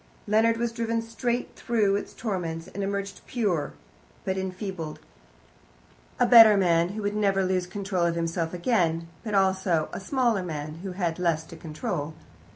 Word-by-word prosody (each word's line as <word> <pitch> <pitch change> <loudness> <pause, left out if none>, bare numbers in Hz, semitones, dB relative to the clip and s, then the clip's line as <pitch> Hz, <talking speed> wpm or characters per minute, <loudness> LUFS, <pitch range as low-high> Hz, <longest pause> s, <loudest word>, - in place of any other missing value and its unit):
Leonard 225 +2 +3
was 235 0 -1
driven 230 0 -1
straight 235 +2 -3
through 215 -5 +1
its 200 - -4
torments 175 -6 -3
and 200 - -6
emerged 200 0 -3
pure, 190 - -1 0.5
but 190 - 0
enfeebled 185 -4 -5 1.2
a - - +5
better 225 -3 +9
man, 170 -2 +3
who 210 +2 -5
would 205 +1 -1
never 195 -2 +2
lose 185 -1 0
control 190 -3 -1
of 170 - -1
himself 165 0 -1
again, 170 -4 0 0.2
but 215 -2 -2
also 190 -4 +2
a - - -4
smaller, 235 0 +1 0.4
who 190 -1 -5
had 175 -3 -2
less 165 -3 +1
to - - -12
control. 155 -1 -4
190 Hz, 155 wpm, -26 LUFS, 170-215 Hz, 1.2 s, better